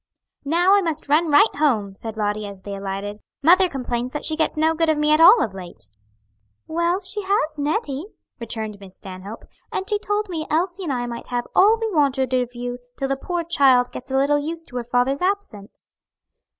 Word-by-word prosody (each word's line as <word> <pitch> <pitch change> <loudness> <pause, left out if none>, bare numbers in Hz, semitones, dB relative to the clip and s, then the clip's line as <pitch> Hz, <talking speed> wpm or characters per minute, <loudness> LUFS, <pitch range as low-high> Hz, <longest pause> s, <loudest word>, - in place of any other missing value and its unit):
"Now 345 +6 +3
I 405 - +5
must 320 -5 -3
run 315 +3 +3
right 355 +9 +5
home," 225 -10 +1
said 220 +2 -8
Lottie, 210 0 -1
as 200 -2 -9
they 200 +1 -7
alighted. 200 +1 -5 0.2
"Mother 365 +4 +6
complains 250 -3 -3
that 295 - -4
she 315 - 0
gets 315 0 0
no 320 +1 +3
good 325 0 +1
of 310 - +2
me 300 0 +2
at 305 +1 +4
all 395 +8 +8
of 210 - -4
late." 180 - -10 0.8
"Well, 340 +3 0
she 390 +2 -3
has 380 -6 0
Nettie," 290 - -2 0.3
returned 220 -3 -5
Miss 190 -2 -13
Stanhope, 195 +3 -9 0.3
"and 380 - -3
she 420 -1 +1
told 415 0 -1
me 320 -4 -4
Elsie 355 +4 -1
and 305 - -2
I 245 -2 -1
might 235 -1 -7
have 245 -1 -2
all 425 +4 +5
we 450 - -1
wanted 270 -4 +1
of 250 -1 0
you 245 0 -5 0.2
till 270 - -2
the 275 - +1
poor 345 +5 -3
child 265 -7 +3
gets 255 +2 -9
a 265 - 0
little 285 +2 +3
used 325 +3 -3
to 250 - -6
her 245 - -2
father's 250 +4 0
absence." 365 - -4
285 Hz, 205 wpm, -22 LUFS, 235-340 Hz, 0.8 s, all